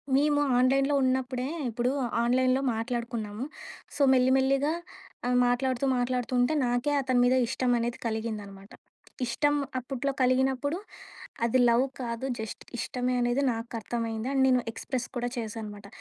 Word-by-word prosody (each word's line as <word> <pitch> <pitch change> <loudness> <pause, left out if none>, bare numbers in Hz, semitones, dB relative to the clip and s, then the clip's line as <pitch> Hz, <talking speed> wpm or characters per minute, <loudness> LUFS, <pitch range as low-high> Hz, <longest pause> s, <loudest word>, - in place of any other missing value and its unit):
మేము 290 +1 +3 0.2
ఆ‌న్‌లైన్‌లో 275 +3 +3
ఉన్నప్పుడే 255 0 0 0.2
ఇప్పుడు 240 +2 0 0.3
ఆ‌న్‌లైన్‌లో 255 +2 +2
మాట్లాడుకున్నాము. 230 -1 -3 0.5
సో, 290 - -3
మెల్లి 255 0 +4
మెల్లిగా 275 +3 +2 0.5
ఆ - - +1 0.2
మాట్లాడుతూ 255 +1 0
మాట్లాడుతూ 245 0 -1
ఉంటే 245 +5 +3
నాకే 245 +4 0
అతని 255 -2 +1
మీద 250 +1 +4
ఇష్టం 250 0 0
అనేది 235 +1 -2
కలిగిందన్నమాట. 210 -3 -5 0.5
ఇష్టం 290 +5 +1 0.2
అప్పట్లో 270 +2 -3
కలిగినప్పుడు 265 +4 +2 0.7
అది 235 +2 +2
లవ్ 235 +2 +4 0.2
కాదు 235 +1 -3
జస్ట్ 220 -1 -6 0.2
ఇష్టమే 250 +1 -1
అనేది 240 +3 +1
నాకర్థమైంది 230 0 -4
అండ్ 270 -1 +2
నేను 250 -1 +3
ఎక్స్‌ప్రెస్ 255 +1 -4
కూడా 245 0 -1
చేశానన్నమాట. 215 -2 -6
250 Hz, 125 wpm, -28 LUFS, 235-265 Hz, 0.7 s, మెల్లి